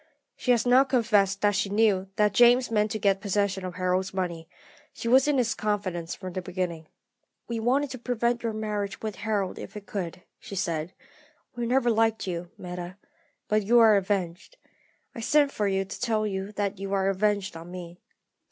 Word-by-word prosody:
She - - -6
has 240 -2 +4
now 250 +2 +6
confessed 215 -7 +2
that 205 0 +3
she 200 0 0
knew 200 -2 +2
that 210 -2 +2
James 245 +2 +5
meant 210 -1 +2
to 215 - -2
get 195 -2 +1
possession 200 -1 0
of 180 -1 -5
Harold's 185 +1 -1
money; 170 -3 -3 0.4
she - - -6
was 260 +4 +5
in 295 -2 +2
his 240 -3 +1
confidence 185 -5 -2
from 185 -2 -8
the 185 - -3
beginning. 175 -3 -4 0.6
"'We 235 -1 -3
wanted 265 +5 +1
to 255 - -6
prevent 240 0 0
your 230 - -1
marriage 210 -1 -4
with 215 -2 -4
Harold 205 -3 -2
if - - -9
we 210 - -6
could,' 185 -3 -5 0.2
she 200 - -9
said. 170 -3 -2 0.6
'We 240 -1 -2
never 245 -1 +3
liked 225 0 +1
you, 175 -2 -4
Meta; 180 +1 -7 0.5
but 215 0 +2
you 225 +4 +3
are 225 -2 +7
avenged. 195 - -2 0.6
I - - -8
sent 285 +4 +3
for 210 -5 -1
you 195 0 0
to 195 - -9
tell 220 -3 +1
you 195 0 -3
that 200 -1 -2
you 195 0 -4
are 195 -1 +1
avenged 200 -1 0
on 165 +1 -9
me.' 175 -1 -9
205 Hz, 190 wpm, -27 LUFS, 185-225 Hz, 0.6 s, are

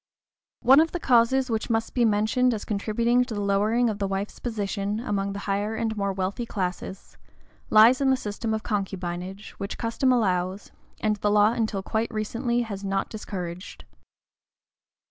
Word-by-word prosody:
One 265 +4 +7
of 325 +1 +2
the 350 - -2
causes 255 -1 +3
which 220 +1 -2
must 225 -1 -1
be 245 -2 +3
mentioned 225 +4 +2
as 210 - -6
contributing 230 +4 +1
to 245 -3 -6
the - - -3
lowering 205 +4 +2
of 215 -2 -2
the 200 - 0
wife's 195 +1 -4
position, 205 -2 -2
among 200 -4 -2
the - - -5
higher 205 +2 -1
and 220 -1 -2
more 200 -1 -1
wealthy 195 +5 -3
classes, 185 -1 -5 0.5
lies 230 +5 +6
in 270 - +3
the 265 - +3
system 220 0 -4
of 220 0 -2
concubinage 190 -1 -4
which 200 - -4
custom 235 +3 +1
allows, 190 -4 0 0.3
and 215 -1 +1
the 205 - 0
law 210 +1 +5
until 220 -4 -2
quite 220 +4 -1
recently 235 +3 -1
has 200 -3 -6
not 195 0 -1
discouraged. 180 -4 -7
215 Hz, 165 wpm, -25 LUFS, 200-235 Hz, 0.5 s, One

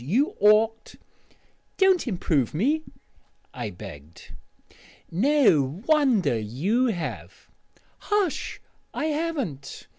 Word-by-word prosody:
You 265 - +1
ought 220 +2 +3 0.4
" - - -40
"Don't 380 -6 +3
improve 160 - 0
me," 285 - +1 0.7
I 120 -4 -5
begged. 85 -5 -12 0.8
"No 185 - +2
wonder 260 - +3
you 170 - 0
have 175 -8 -6 0.2
" - - -32 0.2
"Hush! 415 -6 -1 0.4
I - - -2
haven't. 275 - -4
215 Hz, 95 wpm, -25 LUFS, -, 0.8 s, ought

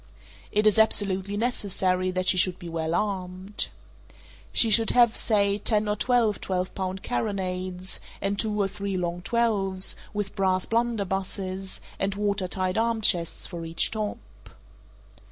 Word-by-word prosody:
It 210 0 +1
is 215 0 +4
absolutely 200 -2 +3
necessary 190 -5 0
that 185 0 -2
she - - +5
should 180 0 +3
be 175 - -9
well 165 0 -2
armed. 190 0 -2 0.8
She 225 - +5
should 225 +2 +6
have, 240 -2 +4
say 200 -2 +1
ten 210 0 +1
or 210 - +1
twelve 230 -2 +1
twelve 185 -1 -2
pound 190 0 -4
carronades, 185 - -2 0.2
and 200 0 -1
two 210 -2 -1
or 200 - +2
three 195 0 -4
long 175 -1 -3
twelves, 195 -4 +1 0.2
with 205 -2 -4
brass 185 -2 +1
blunderbusses, 195 -4 -2 0.2
and 195 0 -1
water 200 -2 -1
tight 185 +2 -1
arm 230 -1 0
chests 175 -5 +2
for 170 -1 -5
each 165 0 +1
top. 215 -2 -3
195 Hz, 145 wpm, -26 LUFS, 185-210 Hz, 0.8 s, should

